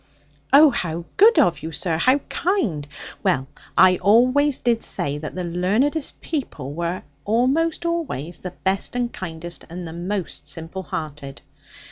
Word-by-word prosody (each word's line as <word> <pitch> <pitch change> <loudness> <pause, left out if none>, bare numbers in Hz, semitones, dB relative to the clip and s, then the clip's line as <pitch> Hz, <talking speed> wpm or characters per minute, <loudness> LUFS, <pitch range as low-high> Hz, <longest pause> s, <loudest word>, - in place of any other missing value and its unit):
'Oh, 290 +2 +8
how 170 -7 -3
good 450 +4 +6
of 175 - +4
you, 160 - -5
sir, 165 +1 -1
how 255 - +4
kind! 225 - -1 0.3
Well, 130 0 +1 0.3
I 185 -1 +7
always 255 +7 +4
did 235 -1 +1
say, 145 +1 -2
that 155 +2 -6
the 180 - -3
learnedest 210 - 0
people 155 - -4
were, 170 +3 -3 0.2
almost 270 +10 +1
always, 300 - -2
the 180 - -5
best 190 +5 -2
and 245 -1 -1
kindest, 170 -1 -7
and 175 +1 -6
the 160 - -7
most 180 +2 -4
simple 165 +3 -4
hearted.' 150 -5 -6
185 Hz, 145 wpm, -22 LUFS, 165-255 Hz, 0.3 s, Oh